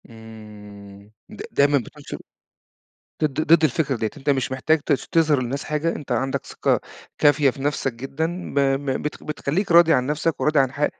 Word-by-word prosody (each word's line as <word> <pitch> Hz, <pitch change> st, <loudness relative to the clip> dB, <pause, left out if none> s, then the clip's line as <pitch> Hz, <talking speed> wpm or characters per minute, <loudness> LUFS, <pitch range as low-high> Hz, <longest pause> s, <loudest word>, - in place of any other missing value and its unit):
امم. 105 Hz, -3 st, -13 dB, 0.2 s
د -, -, -10 dB
دايمًا 145 Hz, 0 st, +3 dB
بتنشُر 120 Hz, -, -7 dB, 1.1 s
ضد 150 Hz, -1 st, 0 dB
ضد 165 Hz, -1 st, +6 dB
الفكرة 145 Hz, -1 st, 0 dB
ديّة، 110 Hz, -1 st, -2 dB
أنتَ 145 Hz, 0 st, -1 dB
مش 130 Hz, -2 st, 0 dB
محتاج 155 Hz, +4 st, +1 dB
ت -, -, +2 dB
تظهَر 150 Hz, 0 st, +2 dB
للناس 135 Hz, +3 st, -4 dB
حاجة، 155 Hz, +2 st, -1 dB
أنتَ 140 Hz, -4 st, -6 dB
عندك 130 Hz, +2 st, -2 dB
ثقة -, -, 0 dB, 0.4 s
كافية 145 Hz, -1 st, +4 dB
في 135 Hz, -, -10 dB
نفسك 140 Hz, -2 st, -1 dB
جدًا، 160 Hz, +9 st, -4 dB
ب -, -, +2 dB
ب 135 Hz, 0 st, 0 dB
بت 150 Hz, -, -5 dB
بتخلِّيك 155 Hz, +5 st, -2 dB
راضي 170 Hz, -1 st, +7 dB
عن 125 Hz, -4 st, +2 dB
نفسك 150 Hz, +2 st, -1 dB
وراضي 150 Hz, -1 st, +2 dB
عن 135 Hz, -2 st, +2 dB
ح 145 Hz, +2 st, 0 dB
140 Hz, 175 wpm, -22 LUFS, 125-150 Hz, 1.1 s, راضي